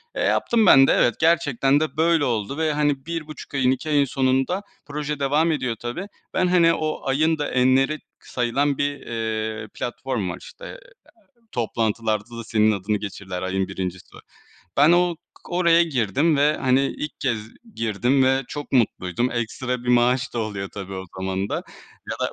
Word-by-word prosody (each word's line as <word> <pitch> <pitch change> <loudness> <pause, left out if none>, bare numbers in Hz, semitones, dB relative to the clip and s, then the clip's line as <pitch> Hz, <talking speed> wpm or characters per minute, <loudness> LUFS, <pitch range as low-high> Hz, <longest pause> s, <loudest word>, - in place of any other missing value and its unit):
Eee, - - -2
yaptım 225 -2 +2
ben 135 -6 +8
de. - - +4
Evet, 120 - +3
gerçekten 145 -4 +3
de 155 0 -3
böyle 165 -2 +3
oldu 120 +2 -2
ve 160 -2 +1
hani 145 -2 0
1.5 155 -3 -6
ayın, 130 -2 +3
2 135 +4 -3
ayın 145 -2 +3
sonunda 135 +8 0 0.2
proje 150 0 -4
devam 150 +4 +2
ediyor 125 -6 -1
tabii. 120 +12 -5 0.3
Ben 185 -1 +2
hani, 170 -2 +4
o 155 -1 -2
ayın 155 +4 +2
da 145 - -3
enleri 130 +4 +3
k - - -36 0.3
sayılan 135 +3 0
bir, 145 0 -1
eee, 110 -1 -3
platform 120 -5 -3
var, 90 - -5
işte, - - -12
eee, - - -9 0.7
toplantılarda 115 -1 -1
da 115 - -6
senin 110 -1 +3
adını 100 +2 -1
geçirirler 95 -3 -6
ayın 95 0 -1
1.'si. 95 -1 -5 0.7
Ben 150 +4 +6
o 175 -1 +3 0.3
k - - -11
oraya 170 -1 +4
girdim 140 - +1
ve 150 +2 +3
hani 130 0 +2
ilk 150 +1 -6
kez 120 -5 0 0.4
girdim 120 +5 +1
ve 135 +1 +2
çok 145 -1 -7
mutluydum. 115 -2 +1
Ekstra 120 +2 -3
bir - - -5
maaş 125 +1 +2
da - - -1
oluyor 100 -3 -3
tabii 95 -1 -6
o 95 0 -5
zaman 95 +1 -2
da - - -2 0.6
ya - - -3
da - - -1
130 Hz, 175 wpm, -23 LUFS, 110-150 Hz, 0.7 s, ben